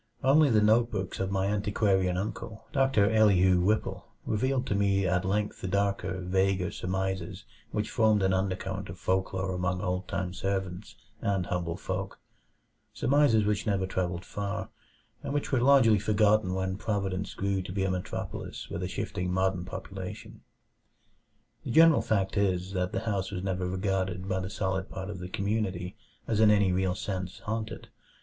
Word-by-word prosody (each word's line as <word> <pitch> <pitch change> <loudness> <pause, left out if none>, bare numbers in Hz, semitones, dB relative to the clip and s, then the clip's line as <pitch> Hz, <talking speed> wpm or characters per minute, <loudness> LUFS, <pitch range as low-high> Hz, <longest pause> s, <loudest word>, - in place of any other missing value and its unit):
Only 145 +3 +5
the 110 -3 +4
notebooks 110 -3 +2
of 95 0 -1
my 95 -1 0
antiquarian 100 -2 +1
uncle, 110 +2 -5
Doctor 135 -7 +3
Elihu 95 -5 +5
Whipple, 105 +4 0 0.2
revealed 130 +4 0
to 105 - -1
me 100 -1 +2
at 90 0 +1
length 105 +2 -1
the - - -3
darker, 100 -1 0
vaguer 95 0 +1
surmises 95 +1 -3 0.2
which 105 0 -2
formed 110 -3 +3
an 95 0 +3
undercurrent 95 0 -2
of 85 - -7
folklore 95 +1 -1
among 90 0 -1
old 90 -1 -2
time 90 -2 -3
servants 95 0 -3 0.3
and 100 -4 0
humble 85 -1 -2
folk; 95 0 -4 0.7
surmises 120 -5 +3
which 105 0 0
never 100 -2 +1
travelled 90 -2 -2
far, 100 -1 -4 0.5
and 140 - -4
which 145 - -1
were 130 -3 +2
largely 125 -5 +6
forgotten 105 -2 +2
when 95 0 -2
Providence 100 -3 -2
grew 100 -1 0
to 95 - -7
be 95 0 -1
a 95 - +1
metropolis 95 0 -5
with - - -3
a - - -2
shifting 90 0 -3
modern 95 -1 0
population. - - -7 1.2
The - - -6
general 160 +4 +6
fact 100 -2 0
is, 95 -2 +1
that 90 -1 -1
the - - -2
house 100 -4 -1
was 95 -2 -5
never 95 -1 -1
regarded 95 -1 -1
by 95 -1 0
the 95 0 -4
solid 95 -3 -2
part 95 +1 -5
of 95 - -7
the 90 0 -6
community 100 -2 -2 0.3
as 110 -2 0
in 110 -1 +6
any 100 -3 +4
real 90 0 +1
sense 95 -2 -4
"haunted." 110 +1 -4
95 Hz, 165 wpm, -29 LUFS, 95-105 Hz, 1.2 s, largely